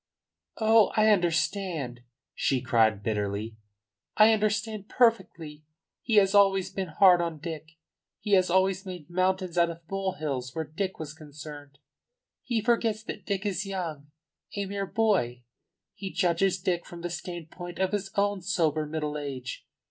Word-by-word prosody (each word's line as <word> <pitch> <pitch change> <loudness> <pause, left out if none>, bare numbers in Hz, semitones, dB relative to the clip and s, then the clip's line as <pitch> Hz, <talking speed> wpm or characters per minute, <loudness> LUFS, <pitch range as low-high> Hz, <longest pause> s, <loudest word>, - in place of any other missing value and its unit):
"Oh, 220 -1 +5
I 215 0 +5
understand," 170 - 0 0.3
she 135 - +1
cried 110 -4 +2
bitterly. 105 0 -2 0.6
"I 215 +1 +7
understand 215 -1 -1
perfectly. 170 -11 +1 0.4
He 230 - 0
has 195 -1 +5
always 195 -2 +4
been 190 -1 -3
hard 180 +2 +5
on 165 -2 -2
Dick! 160 0 -7 0.5
He 210 - -5
has 185 -2 +4
always 190 +1 +2
made 180 -4 -9
mountains 185 -1 0
out 170 0 +4
of 170 0 -8
molehills 155 -10 -3
where 160 -1 -2
Dick 185 +6 -4
was 155 -2 -6
concerned. 145 -2 -11 0.6
He 235 -3 -1
forgets 225 -2 +1
that 205 -3 -8
Dick 200 0 -2
is 195 0 -1
young 165 -7 -5 0.5
a 200 -1 -2
mere 200 0 -3
boy. 185 - +1 0.5
He 195 -2 -6
judges 180 0 +1
Dick 180 -2 -1
from 170 -1 -10
the 175 - -3
standpoint 175 0 -7
of 190 0 0
his 200 -2 -2
own 200 -1 +1
sober 160 -5 0
middle 150 -1 -3
age. 130 -3 -6
180 Hz, 150 wpm, -28 LUFS, 150-200 Hz, 0.6 s, I